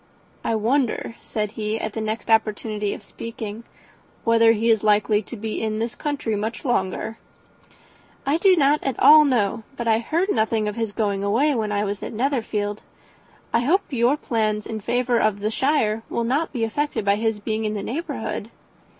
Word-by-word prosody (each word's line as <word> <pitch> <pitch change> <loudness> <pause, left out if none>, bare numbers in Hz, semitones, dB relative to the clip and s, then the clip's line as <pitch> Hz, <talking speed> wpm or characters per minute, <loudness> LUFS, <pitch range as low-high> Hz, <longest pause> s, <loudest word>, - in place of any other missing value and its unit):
"I 225 - 0
wonder," 230 +1 0
said 210 -2 -3
he, 215 0 -2
at 220 -2 -4
the 220 - -3
next 220 +1 -3
opportunity 215 -1 +1
of - - -12
speaking, 225 -1 -7 0.6
"whether 230 0 +5
he 230 +1 +2
is 220 -2 +2
likely 210 0 +3
to 220 - -9
be 220 +1 -4
in 215 -1 -1
this 230 +1 -2
country 285 -7 -2
much 220 +6 -4
longer." 220 -1 -1 1.1
"I 280 +3 +2
do 380 0 +5
not 295 -2 +3
at 270 -3 -2
all 305 0 +9
know; 230 -6 +1 0.2
but 235 - -3
I 220 0 +4
heard 335 - 0
nothing 220 -1 +1
of 210 - -3
his 225 -2 -2
going 205 -2 -1
away 245 +9 +2
when 220 -4 -1
I 205 0 0
was 205 0 -3
at - - -6
Netherfield. 220 -4 -1 0.7
I 230 - +4
hope 320 +12 +3
your 250 +2 +2
plans 215 -6 -1
in 220 - -4
favour 240 +2 +1
of 215 -2 +1
the 210 +2 -1
shire 225 -5 +1
will 235 - -1
not 280 +8 0
be 240 -4 -2
affected 225 -1 -1
by 200 0 +3
his 220 -1 -1
being 220 +1 -2
in 215 0 -1
the 200 - -3
neighbourhood." 320 +8 -4
225 Hz, 185 wpm, -23 LUFS, 210-245 Hz, 1.1 s, all